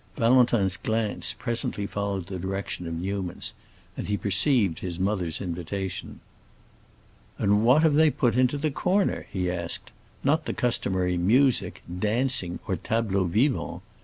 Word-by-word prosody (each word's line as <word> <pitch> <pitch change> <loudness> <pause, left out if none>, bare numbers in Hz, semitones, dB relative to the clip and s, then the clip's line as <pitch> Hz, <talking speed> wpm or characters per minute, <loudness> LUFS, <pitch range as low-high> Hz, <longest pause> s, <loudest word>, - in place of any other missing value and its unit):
Valentin's 115 -6 +3
glance 110 -1 0
presently 115 -3 -1
followed 100 -2 -3
the 95 -1 -6
direction 95 -1 -4
of 85 - -4
Newman's, 95 +1 -4 0.4
and - - -5
he 105 0 0
perceived 100 - +2
his 90 -2 -5
mother's 95 -4 -1
invitation. 90 +1 -5 1.2
"And 105 +2 +2
what 130 +7 +5
have 160 -2 +4
they 155 +1 +5
put 125 -4 +1
into 130 +2 +3
the 150 +1 -1
corner?" 190 +7 0
he 90 -2 -1
asked. 85 -2 -4 0.3
"Not 155 +3 +2
the - - -2
customary 95 -7 0
'music,' 125 +8 +2 0.2
'dancing,' 110 -4 0
or - - 0
'tableaux 105 -4 0
vivants'? 115 - 0
100 Hz, 135 wpm, -26 LUFS, 95-125 Hz, 1.2 s, what